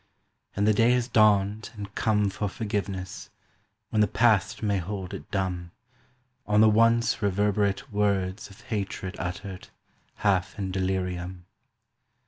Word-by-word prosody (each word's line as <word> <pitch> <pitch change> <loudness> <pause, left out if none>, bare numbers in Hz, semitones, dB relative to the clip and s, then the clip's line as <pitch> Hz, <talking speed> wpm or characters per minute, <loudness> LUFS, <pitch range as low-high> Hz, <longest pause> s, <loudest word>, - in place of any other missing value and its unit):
"And 100 - +1
the 110 - +5
day 115 +3 +4
has 125 -1 +1
dawned 105 -2 +3
and 100 -2 -8
come 105 -2 +1
For 105 +1 -2
forgiveness, 100 -3 -4 0.6
when 110 - +2
the 105 - +4
past 115 -3 +2
may 100 -2 +1
hold 95 +1 -5
it 75 - -8
dumb 90 -3 -2 0.8
On 105 0 +3
the 110 - +7
once 115 +2 +3
reverberate 100 +3 0
words 100 -1 0
of 100 - -15
hatred 100 -3 -4
uttered 95 +2 -5 0.6
Half 95 -3 +1
in 95 -2 -3
delirium 90 -1 -2
100 Hz, 130 wpm, -27 LUFS, 95-105 Hz, 0.8 s, the